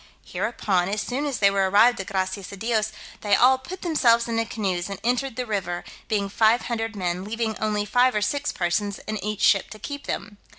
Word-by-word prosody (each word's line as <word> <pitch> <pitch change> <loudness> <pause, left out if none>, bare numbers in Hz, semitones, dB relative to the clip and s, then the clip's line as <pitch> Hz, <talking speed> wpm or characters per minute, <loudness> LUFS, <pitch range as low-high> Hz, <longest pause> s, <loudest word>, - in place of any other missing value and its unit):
Hereupon, 185 -3 -1
as 210 +2 -1
soon 275 +4 -2
as 275 - -2
they 200 -1 +4
were 195 -1 +1
arrived 225 +5 +5
at 195 - -9
Gracias 190 0 -3
a 200 - -8
Dios, 220 0 0 0.3
they 205 -1 +3
all 260 +3 +5
put 350 +8 -9
themselves 240 -9 +3
into 230 -1 0
canoes, 190 -5 -2
and 195 - -6
entered 250 +1 0
the 250 - -3
river, 185 -5 -3 0.2
being 205 -3 0
five 220 +4 +3
hundred 225 -2 -3
men, 180 -1 -2
leaving 220 +1 -2
only 210 -1 0
five 250 +2 +3
or 210 - +1
six 285 +9 -1
persons 195 +3 -1
in 215 0 -4
each 210 0 -3
ship 195 - +4
to 215 - -9
keep 285 +5 -7
them. 205 +1 -4
215 Hz, 210 wpm, -24 LUFS, 195-240 Hz, 0.3 s, arrived